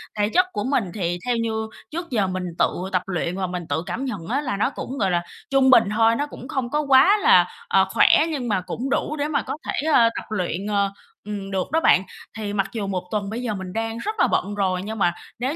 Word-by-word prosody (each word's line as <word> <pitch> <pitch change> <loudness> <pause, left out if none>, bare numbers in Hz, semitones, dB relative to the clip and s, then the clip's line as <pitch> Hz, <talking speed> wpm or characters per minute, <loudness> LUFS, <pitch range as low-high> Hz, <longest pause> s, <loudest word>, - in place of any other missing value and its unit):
Thể 210 0 +1
chất 365 +10 +4
của 205 - -2
mình 260 -1 +1
thì 175 -3 -2
theo 245 -1 +1
như 220 -1 -2 0.2
trước 340 +2 -5
giờ 210 -6 +1
mình 185 0 -3 0.2
tự 185 +2 0
tập 185 - +1
luyện 180 -1 -2
và 190 - -1
mình 180 -2 -5
tự 150 +3 -1
cảm 260 +4 -3
nhận 195 -10 -5
á 270 +5 0
là 255 -8 -2
nó 210 - +2
cũng, 270 0 -6
gọi 195 -6 +1
là, 175 0 +1 0.3
trung 270 -1 +4
bình 250 -3 +7
thôi, 225 +1 +4
nó 290 - -1
cũng 255 - -10
không 255 -3 -2
có 295 +3 0
quá 280 +9 +6
là, - - +5 0.2
ờ, - - +4
khỏe, - - +5
nhưng 275 -6 -3
mà 205 -5 +1
cũng 245 +8 -4
đủ 300 - -1
để 290 -1 -1
mà 295 -2 0
có - - -5
thể, 305 - -2
ờ, 230 -1 +6
tập - - -5
luyện, 185 -2 -2
ờ, 200 -1 +1 0.3
ừm, 200 -2 -5
được 190 +2 -2
đó 320 - +3
bạn. 185 - +4 0.3
Thì 205 -2 -4
mặc 195 -2 0
dù 205 -3 -3
1 185 -2 -2
tuần 205 -2 -2
bây 230 +3 -4
giờ 235 -4 -2
mình 190 -2 -6
đang 225 0 -2
rất 430 - -3
là - - +5
bận 205 +1 -1
rồi, 185 -2 0
nhưng 220 +1 -5
mà 175 -2 +3 0.3
nếu 260 +6 -1
220 Hz, 260 wpm, -23 LUFS, 190-260 Hz, 0.3 s, bình